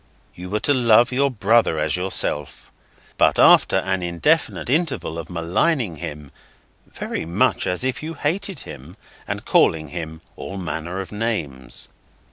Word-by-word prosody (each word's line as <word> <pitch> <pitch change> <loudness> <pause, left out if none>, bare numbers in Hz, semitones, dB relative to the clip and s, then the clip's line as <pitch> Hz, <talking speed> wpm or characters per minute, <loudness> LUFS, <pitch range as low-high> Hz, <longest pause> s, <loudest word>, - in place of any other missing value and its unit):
You 90 +1 -9
were 105 +2 0
to 145 - +3
love 120 -2 +4
your 140 +2 +2
brother 110 -6 +2
as 75 0 0
yourself, 90 -5 -2 0.5
but - - +4
after - - +6
an 95 -1 -1
indefinite 90 - 0
interval 135 - -1
of 85 - -8
maligning 90 - 0
him 75 -1 -7 0.6
(very - - -5
much 85 +2 +1
as 90 +6 -1
if 130 -2 -2
you 160 +2 -6
hated 180 +6 -2
him), 70 +7 -11 0.3
and - - -4
calling 80 -2 +3
him 80 0 -6
all 100 - -7
manner 85 +1 -4
of 95 - -9
names. 105 - -3
95 Hz, 145 wpm, -22 LUFS, 80-125 Hz, 0.6 s, after